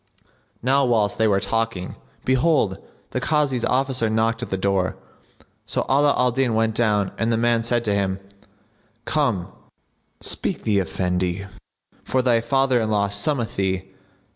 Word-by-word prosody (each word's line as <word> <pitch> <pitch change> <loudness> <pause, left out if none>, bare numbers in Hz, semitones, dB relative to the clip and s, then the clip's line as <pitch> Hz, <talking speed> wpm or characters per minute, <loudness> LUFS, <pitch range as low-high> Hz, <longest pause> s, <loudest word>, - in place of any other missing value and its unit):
Now 135 +3 +3
whilst 110 -5 +1
they 110 - +4
were 100 -2 +3
talking, 115 -3 -2 0.3
behold, 130 - +2 0.3
the - - -2
Kazi's 145 -6 +1
officer 130 -3 +1
knocked 115 +1 0
at 125 - -5
the 95 - -1
door; 95 -1 0 0.7
so - - -1
Ala 140 +2 +3
al 125 0 +3
Din 125 -2 0
went 110 0 +1
down 105 -4 +1
and 115 +1 +1
the 115 - +2
man 120 0 +2
said 120 0 0
to 105 - +1
him, 95 -1 -1 0.9
"Come, 90 -2 0 0.7
speak - - -1
the 105 -2 +2
Efendi,[FN#67] 90 +1 -2 0.5
for 130 -1 0
thy 120 -2 +3
fatherinlaw 115 -5 +1
summoneth 115 +3 0
thee." 95 0 -1
115 Hz, 140 wpm, -22 LUFS, 100-125 Hz, 0.9 s, they